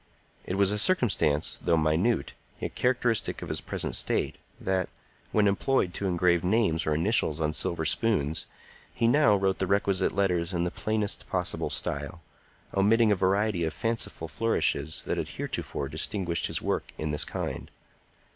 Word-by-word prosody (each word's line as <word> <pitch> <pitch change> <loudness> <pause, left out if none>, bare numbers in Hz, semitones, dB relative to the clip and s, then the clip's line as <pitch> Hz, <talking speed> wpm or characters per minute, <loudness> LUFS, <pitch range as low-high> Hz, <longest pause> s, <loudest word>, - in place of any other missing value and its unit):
It 90 - -2
was 100 0 +3
a 105 - +1
circumstance, 105 - +2
though 85 -1 +3
minute, 80 +4 +1 0.3
yet - - -4
characteristic 120 -4 0
of - - -7
his - - -2
present - - -3
state, - - -1 0.2
that, 95 -1 -1 0.4
when 105 -1 +3
employed 100 -1 +1
to 100 - -2
engrave 85 -1 +2
names 90 -5 +2
or 75 - +2
initials 80 -3 +2
on 75 -1 0
silver 80 +3 -1
spoons, 80 -6 0 0.4
he 115 - +1
now 120 -4 +5
wrote 95 -1 0
the 95 - 0
requisite 100 -1 +2
letters 90 -3 0
in 85 -1 0
the 90 - -1
plainest 110 -2 -2
possible - - -1
style, 75 +5 -4 0.6
omitting 105 +3 +4
a - - +4
variety 95 0 +1
of 80 -2 -2
fanciful 115 -7 -3
flourishes 80 -7 0
that - - -2
had - - -2
heretofore 70 - -4
distinguished 85 +3 -1
his - - -3
work - - -2
in 75 -1 -2
this 75 - 0
kind. - - -5
95 Hz, 160 wpm, -28 LUFS, 80-105 Hz, 0.6 s, now